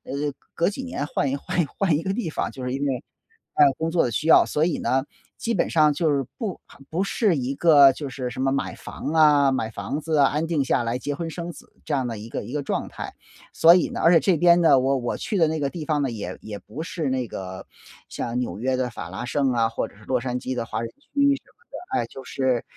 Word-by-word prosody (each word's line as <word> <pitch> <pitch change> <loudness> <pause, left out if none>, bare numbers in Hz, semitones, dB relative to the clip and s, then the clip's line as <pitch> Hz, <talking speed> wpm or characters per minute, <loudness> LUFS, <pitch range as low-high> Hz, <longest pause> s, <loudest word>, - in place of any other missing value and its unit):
呃， - - -8 0.4
隔 170 +2 +2
几 265 +6 -6
年 200 - -4
换 140 -3 -1
一 140 - -1
换 170 +4 -1
一 - - -2
换 175 -1 0
一 160 - -2
个 190 - -1
地 220 -4 -2
方， - - -2
就 130 - -8
是 125 - -2
因 140 +2 -2
为， 130 -3 -2 0.5
呃， 150 - +7
工 160 +1 0
作 165 0 +2
的 120 - -2
需 155 - -2
要。 - - +7
所 150 - 0
以 170 0 +1
呢， 130 +1 +1 0.3
基 230 - -2
本 - - +1
上 155 -2 +5
就 150 +1 +1
是 140 -1 +1
不 215 -7 -4 0.3
不 175 +4 0
是 200 -2 +1
一 135 +1 -2
个 145 -5 +7
就 145 +1 -6
是 125 -1 -4
什 130 - -5
么 135 0 +2
买 140 - -2
房 145 - -6
啊， 150 -3 +5
买 115 -4 -1
房 105 +9 -4
子 155 0 -1
啊， 140 -1 +6
安 150 +4 -1
定 160 -4 0
下 125 -2 +1
来， 115 +2 -2
结 145 +2 -3
婚 165 +1 -4
生 170 +1 -5
子 - - -15
这 150 - -3
样 130 -2 0
的 115 -3 -5
一 110 - -9
个 - - -4
一 125 - -8
个 150 - -1
状 - - -2
态。 - - -7 0.4
所 165 +1 +7
以 180 - +2
呢 - - -4
而 165 - +6
且 165 - +7
这 180 -2 +2
边 175 +1 +5
呢， 150 -5 +6
我 135 +1 +2
我 120 -1 -2
去 205 - -2
的 160 - +5
那 160 0 -1
个 140 - 0
地 165 0 -6
方 150 -1 +1
呢， 130 - -1
也 100 -5 -5
也 105 -2 -7
不 155 +4 -7
是 165 -5 -3
那 130 -2 -1
个 95 -2 -7 0.4
像 120 +1 -4
纽 105 -6 -3
约 130 +2 0
的 125 -1 -1
法 - - -7
拉 - - -5
盛 135 +1 +1
啊， 115 -2 +2
或 115 - -2
者 - - -20
是 110 - -17
洛 125 -2 0
杉 125 -1 -2
矶 130 - -4
的 120 -2 -2
华 - - -4
人 115 - -4
区 - - -32
什 280 - +2
么 280 - -2
的， - - +2
哎， 115 - -3
就 130 +3 -11
是， 130 -3 0
140 Hz, 295 characters per minute, -24 LUFS, 125-165 Hz, 0.5 s, 呃